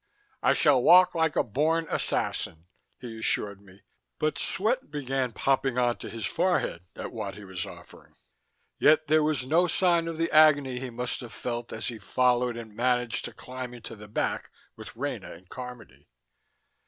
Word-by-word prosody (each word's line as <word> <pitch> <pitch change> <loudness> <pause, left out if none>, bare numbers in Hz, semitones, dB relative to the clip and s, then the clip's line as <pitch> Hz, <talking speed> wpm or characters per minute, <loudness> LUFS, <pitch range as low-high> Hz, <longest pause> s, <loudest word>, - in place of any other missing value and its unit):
"I - - +4
shall 135 -4 +4
walk 180 +6 +7
like 160 -3 +1
a - - +3
born 155 +8 +1
assassin," 80 - -2 0.3
he 115 -3 -8
assured 100 -2 -1
me, 100 -1 -19 0.3
but 155 -2 -1
sweat 220 - -1
began 135 -3 -2
popping 135 +1 0
onto 120 -1 0
his 115 -2 -5
forehead 175 - 0
at - - -6
what 100 -2 -5
he 105 - -10
was 95 -2 -5
offering. - - -14 0.6
Yet 155 +1 +5
there 155 +1 +4
was 150 -4 0
no 165 +6 +3
sign 170 -2 +2
of 165 -1 -4
the 165 +1 0
agony 145 -5 +5
he 130 0 -5
must 125 +1 -3
have 120 -2 -9
felt 120 -1 -4
as 110 - -3
he 115 -2 -7
followed 125 +2 +1
and 110 -3 -9
managed 125 -1 0
to - - -6
climb 125 -1 -8
into 120 - -8
the 105 0 -12
back 105 - -2 0.3
with - - -11
Rena 115 -8 -4
and 90 +2 -15
Carmody. 125 -2 -10
125 Hz, 170 wpm, -27 LUFS, 115-155 Hz, 0.6 s, walk